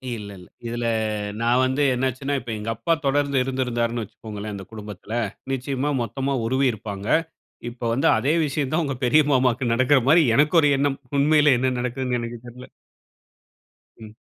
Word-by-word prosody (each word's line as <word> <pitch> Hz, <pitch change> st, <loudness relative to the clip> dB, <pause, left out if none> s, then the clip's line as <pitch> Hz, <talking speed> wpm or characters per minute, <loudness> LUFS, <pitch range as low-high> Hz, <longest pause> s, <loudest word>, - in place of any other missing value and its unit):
இல்ல, 105 Hz, -2 st, -8 dB
இல்ல. 90 Hz, -, -14 dB, 0.2 s
இதுல 120 Hz, 0 st, -3 dB, 0.6 s
நான் 120 Hz, +2 st, +3 dB
வந்து 130 Hz, +3 st, 0 dB
என்ன 130 Hz, +2 st, 0 dB
ஆச்சுனா, 140 Hz, +3 st, -3 dB
இப்ப 120 Hz, -1 st, -7 dB
எங்க 105 Hz, +2 st, -5 dB
அப்பா 115 Hz, +9 st, 0 dB
தொடர்ந்து 140 Hz, -1 st, +1 dB
இருந்திருந்தாருன்னு 120 Hz, -3 st, -1 dB
வச்சுக்கோங்களேன் 105 Hz, 0 st, -8 dB
அந்த 95 Hz, -2 st, -8 dB
குடும்பத்துல, 105 Hz, 0 st, -9 dB, 0.4 s
நிச்சயமா 135 Hz, +2 st, -2 dB
மொத்தமா 135 Hz, +5 st, -2 dB
உருவி 130 Hz, +3 st, +1 dB
இருப்பாங்க. 100 Hz, -1 st, -7 dB, 0.6 s
இப்போ 120 Hz, 0 st, -9 dB
வந்து 135 Hz, -, +1 dB
அதே 145 Hz, +4 st, +1 dB
விஷயம் 140 Hz, -2 st, -2 dB
தான் 165 Hz, +2 st, +2 dB
உங்க 140 Hz, -, -2 dB
பெரிய 150 Hz, +6 st, +5 dB
மாமாவுக்கு 125 Hz, -1 st, +2 dB
நடக்குற 130 Hz, +3 st, +4 dB
மாரி 165 Hz, +3 st, +6 dB
எனக்கு 150 Hz, +4 st, +3 dB
ஒரு 145 Hz, -, +4 dB
எண்ணம். 140 Hz, -1 st, 0 dB, 0.2 s
உண்மையிலே 150 Hz, -1 st, +5 dB
என்ன 130 Hz, +1 st, +1 dB
நடக்குதுன்னு 125 Hz, 0 st, -2 dB
எனக்கு 120 Hz, 0 st, -5 dB
தெரியல. 125 Hz, +1 st, -11 dB, 1.3 s
ம். 110 Hz, -1 st, -12 dB
125 Hz, 160 wpm, -23 LUFS, 115-140 Hz, 1.3 s, மாரி